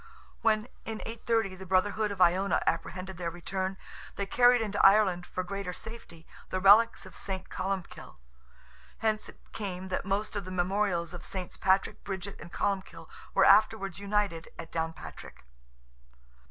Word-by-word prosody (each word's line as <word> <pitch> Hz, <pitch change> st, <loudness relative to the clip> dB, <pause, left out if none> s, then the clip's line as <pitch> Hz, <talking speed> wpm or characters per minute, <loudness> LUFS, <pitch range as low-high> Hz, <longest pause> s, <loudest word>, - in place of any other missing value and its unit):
When, 215 Hz, -1 st, +2 dB, 0.2 s
in 220 Hz, -1 st, -5 dB
830, 225 Hz, -3 st, -1 dB
the 190 Hz, -, -9 dB
brotherhood 205 Hz, +4 st, +2 dB
of 200 Hz, -2 st, -6 dB
Iona 185 Hz, +1 st, +4 dB
apprehended 185 Hz, +2 st, -2 dB
their 170 Hz, -1 st, -2 dB
return, 190 Hz, +3 st, -3 dB, 0.4 s
they 200 Hz, -, -2 dB
carried 245 Hz, +4 st, +5 dB
into 210 Hz, -2 st, -1 dB
Ireland, 195 Hz, -3 st, +5 dB
for 185 Hz, -, -3 dB
greater 195 Hz, 0 st, -4 dB
safety, 220 Hz, -8 st, -10 dB, 0.2 s
the 185 Hz, -, -1 dB
relics 210 Hz, +5 st, +6 dB
of -, -, -12 dB
St. 190 Hz, -1 st, -5 dB
Columbkill. 190 Hz, -1 st, -4 dB, 0.8 s
Hence 215 Hz, -1 st, -1 dB
it -, -, -14 dB, 0.2 s
came 190 Hz, -3 st, -5 dB
that 185 Hz, -, -1 dB
most 200 Hz, +3 st, -2 dB
of 200 Hz, -, -2 dB
the 185 Hz, -, -8 dB
memorials 185 Hz, -1 st, 0 dB
of 175 Hz, -, -7 dB
SS. 185 Hz, -2 st, -5 dB
Patrick, 190 Hz, 0 st, +1 dB
Bridget, 195 Hz, 0 st, -6 dB
and 170 Hz, -, -10 dB
Columbkill, 195 Hz, -1 st, -3 dB, 0.3 s
were -, -, +6 dB
afterwards 200 Hz, -4 st, +4 dB
united 200 Hz, -5 st, -1 dB
at 165 Hz, -, -8 dB
Downpatrick. 165 Hz, 0 st, -6 dB
195 Hz, 150 wpm, -30 LUFS, 180-210 Hz, 0.8 s, relics